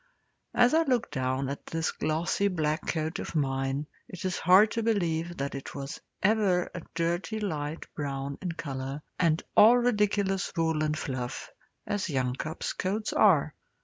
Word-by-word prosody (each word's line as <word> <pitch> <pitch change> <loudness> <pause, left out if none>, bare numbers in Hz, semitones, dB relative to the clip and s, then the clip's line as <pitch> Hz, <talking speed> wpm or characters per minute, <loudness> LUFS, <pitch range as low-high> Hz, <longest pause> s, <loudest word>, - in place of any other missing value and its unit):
As 245 +2 +5
I 325 - +5
look 255 -7 0
down 130 0 -1
at 140 +1 -5
this 165 0 -1
glossy 160 +6 0
black 155 -4 -1
coat 160 0 -1
of - - -6
mine, 135 0 0 0.2
it 185 0 -7
is 185 - -1
hard 190 +5 +6
to 230 - -1
believe 175 -6 0
that 140 +1 -3
it 135 - -7
was 140 +2 -6 0.2
ever 195 -4 +2
a 175 - -5
dirty 175 +6 -1
light 155 -6 -3
brown 140 -1 -4
in 180 -3 -3
colour, 135 -2 -5 0.2
and 165 -2 +2
all 230 +3 +8
ridiculous 205 -5 +1
wool 160 -2 +1
and 155 0 0
fluff, 130 -3 -4 0.3
as 205 -3 -2
young 130 -4 0
cubs' 155 +4 -4
coats 205 +3 -2
are. 160 -8 +4
165 Hz, 160 wpm, -28 LUFS, 140-200 Hz, 0.3 s, all